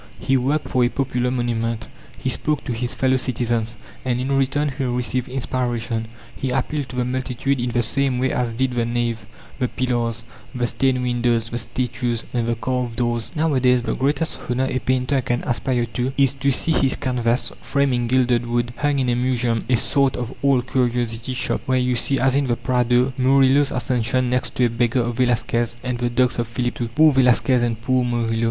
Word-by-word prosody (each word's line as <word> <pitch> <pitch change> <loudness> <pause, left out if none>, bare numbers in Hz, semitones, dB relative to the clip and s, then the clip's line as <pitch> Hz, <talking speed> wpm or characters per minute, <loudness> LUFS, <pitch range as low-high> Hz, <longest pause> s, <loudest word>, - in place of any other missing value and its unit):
He 135 - +1
worked 140 +4 0
for 125 - +2
a 120 - +3
popular 125 -2 -1
monument; 115 -2 -2 0.3
he - - -5
spoke 150 -2 0
to 125 - -2
his 120 +1 -2
fellow 130 0 +2
citizens, 120 -3 -1 0.3
and 125 -1 0
in 135 +2 0
return 140 +2 +1
he 135 - -2
received 125 0 -1
inspiration; 120 -3 -2 0.3
he 135 - -3
appealed 135 +2 -2
to - - -8
the 125 -1 0
multitude 130 +1 -1
in 120 +1 -1
the 120 0 +1
same 135 +2 0
way 130 +1 +1
as 120 -2 -1
did 130 +2 0
the 120 -1 0
nave, 120 -1 -2 0.3
the 125 - +1
pillars, 120 -2 -1 0.3
the 125 -1 0
stained 130 +1 +1
windows, 120 -2 0
the 120 - -2
statues, 120 -1 -2
and 120 -2 0
the 120 - +1
carved 125 0 -2
doors. 120 -1 -1
Nowadays 130 -6 +2
the - - -1
greatest 150 +4 -1
honour 125 +2 +1
a 130 -1 -1
painter 130 +1 0
can 120 0 -2
aspire 120 0 0
to 125 +2 -1
is 135 -1 +3
to 140 0 0
see 140 +4 +2
his 135 -4 +2
canvas, 125 -2 0
framed 140 -2 +1
in 120 -1 0
gilded 125 -1 +2
wood, 120 0 -1
hung 145 -1 +1
in 130 -2 +1
a 120 - +2
museum, 120 -2 0
a 125 - +4
sort 135 +2 +2
of 125 +1 -4
old 135 -3 +3
curiosity 120 -1 -1
shop, - - -1
where 130 0 +2
you 125 0 +1
see, 135 +3 +1
as 130 +1 +3
in 140 0 +1
the 120 - +1
Prado, 125 +1 +1
Murillo's 135 +2 +4
Ascension 125 0 0
next 125 0 -1
to 125 - +3
a - - +2
beggar 120 +1 +1
of 120 0 -3
Velasquez 120 -1 +1
and 125 -1 -2
the 120 0 0
dogs 125 0 +1
of 120 - -1
Philip 120 +1 -3
II. 120 - 0
Poor 155 +6 +4
Velasquez 125 -1 +3
and 115 -2 -1
poor 130 0 +2
Murillo! 115 -2 -1
125 Hz, 200 wpm, -21 LUFS, 120-130 Hz, 0.3 s, a